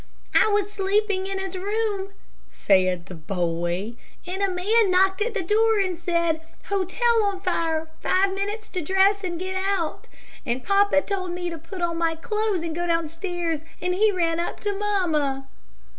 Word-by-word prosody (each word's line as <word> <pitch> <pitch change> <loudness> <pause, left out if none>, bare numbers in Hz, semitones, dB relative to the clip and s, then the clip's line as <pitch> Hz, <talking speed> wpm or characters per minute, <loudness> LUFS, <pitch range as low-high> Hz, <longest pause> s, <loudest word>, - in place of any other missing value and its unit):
"I - - +6
was 410 -1 +1
sleeping 395 -1 +1
in 390 0 -3
his 385 -1 -4
room," 405 0 -1 0.4
said 185 -3 +2
the 190 - -9
boy, 175 +4 -2 0.3
"and 370 +2 -4
a 395 - +2
man 400 +4 +2
knocked 380 +2 +3
at 455 +1 -1
the 395 - 0
door, 440 +4 +3
and 375 -2 0
said, 335 -2 0 0.3
'Hotel 440 +4 +2
on 400 -2 -1
fire. 330 -4 -1
Five 380 +1 +2
minutes 410 +3 -3
to 365 - -3
dress 385 +4 +3
and 350 -2 -2
get 375 +2 -4
out,' 385 -5 -1 0.4
and 250 -1 -2
papa 395 -7 +4
told 370 -3 -3
me 355 0 -3
to 330 - -6
put 350 +3 -7
on 335 -1 -1
my 330 -1 +1
clothes 425 +1 -1
and 330 -2 -3
go 345 +1 -2
downstairs, 330 0 -1 0.2
and 360 0 0
he 425 +3 +4
ran 335 -3 0
up 345 - -3
to 410 -1 -1
mamma." 325 -10 0
370 Hz, 175 wpm, -24 LUFS, 330-400 Hz, 0.4 s, I